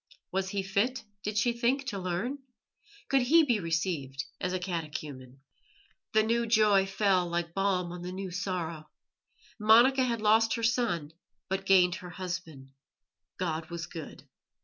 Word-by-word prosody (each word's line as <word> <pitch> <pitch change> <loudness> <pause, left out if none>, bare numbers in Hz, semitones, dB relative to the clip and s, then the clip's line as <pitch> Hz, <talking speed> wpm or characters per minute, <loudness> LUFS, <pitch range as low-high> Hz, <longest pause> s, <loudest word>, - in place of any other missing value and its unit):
Was 190 0 -1
he 200 -1 -2
fit, 200 +7 0 0.2
did 210 +1 -3
she 235 +2 +2
think, 250 +4 0
to 200 - -4
learn? 185 +10 -2 0.7
Could 275 -1 +3
he 320 +7 +5
be 240 -7 +2
received 165 -6 -2
as 180 - -2
a 185 - 0
catechumen? 150 -7 -6 0.7
The 215 -1 +5
new 235 +1 +1
joy 210 -3 +4
fell 195 -2 +2
like 170 0 -2
balm 190 -2 0
on 175 0 -7
the 180 +1 -5
new 190 0 -5
sorrow. 170 -4 -4 0.7
Monica 240 +5 +6
had 235 -2 0
lost 220 +2 +4
her 230 - -4
son, 225 -10 0 0.4
but 195 0 -2
gained 180 -2 +5
her 180 - -8
husband. 170 -7 -6 0.7
God 160 -3 -3
was 170 -2 -5
good. 160 -2 -9
190 Hz, 150 wpm, -29 LUFS, 170-220 Hz, 0.7 s, Monica